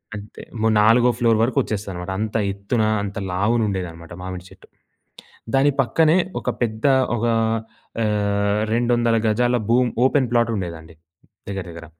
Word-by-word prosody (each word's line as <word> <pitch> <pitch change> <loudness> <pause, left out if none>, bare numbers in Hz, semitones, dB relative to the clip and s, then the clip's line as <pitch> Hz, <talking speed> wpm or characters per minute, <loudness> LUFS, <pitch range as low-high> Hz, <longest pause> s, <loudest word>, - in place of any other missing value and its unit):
అంతే 105 0 -10 0.4
నాలుగో 115 +3 +5
ఫ్లోర్ 115 -3 +3
వరకు 120 +1 -1
వచ్చేస్తదన్నమాట. 95 -4 -5
అంత 110 0 -3 0.2
ఎత్తున, 100 +4 -1 0.2
అంత 100 -1 -6
లావున 105 +6 +1
ఉండేదన్నమాట 85 -4 -5
మామిడి 90 -1 -7
చెట్టు. - - -18 0.9
దాని 140 +2 +4
పక్కనే 160 +7 +3 0.2
ఒక - - -2
పెద్ద 110 0 -3 0.3
ఒక 115 - -1 0.8
ఆహ్, 100 -1 0
200 120 0 +2
గజాల 120 +3 +2
భూమి 125 +1 +3 0.2
ఓపెన్ 130 -2 +2
ప్లాట్ 120 -1 +3
ఉండేదండి 85 -3 -7 0.5
దగ్గర, 95 -2 -4
దగ్గర... 85 0 -10
105 Hz, 130 wpm, -21 LUFS, 95-120 Hz, 0.9 s, నాలుగో